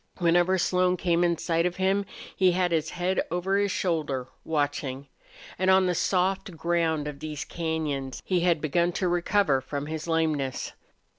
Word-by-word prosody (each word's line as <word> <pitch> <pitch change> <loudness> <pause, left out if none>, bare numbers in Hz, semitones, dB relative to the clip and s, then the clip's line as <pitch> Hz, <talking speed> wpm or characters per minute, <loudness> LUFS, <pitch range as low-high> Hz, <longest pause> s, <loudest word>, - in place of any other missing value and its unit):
Whenever 175 +1 +3
Slone 180 +1 +2
came 175 -1 +1
in 170 -1 +2
sight 165 +1 +1
of 175 - -4
him 195 +1 +1 0.3
he 185 -2 +4
had 180 -1 +1
his 160 -1 0
head 180 +2 0
over 185 +3 0
his 205 0 +1
shoulder, 150 -9 -1 0.2
watching. 145 -3 -2 0.5
And 185 0 +2
on 190 0 +5
the 180 - +1
soft 190 0 0
ground 165 -3 0
of 145 -1 -6
these 150 -1 -5
cañons 155 -5 -3
he 185 -2 +1
had 170 -3 +2
begun 170 +3 +1
to 185 - 0
recover 175 -4 +2
from 145 +2 -4
his 155 +1 -5
lameness. 155 -5 -1
170 Hz, 165 wpm, -27 LUFS, 155-180 Hz, 0.5 s, on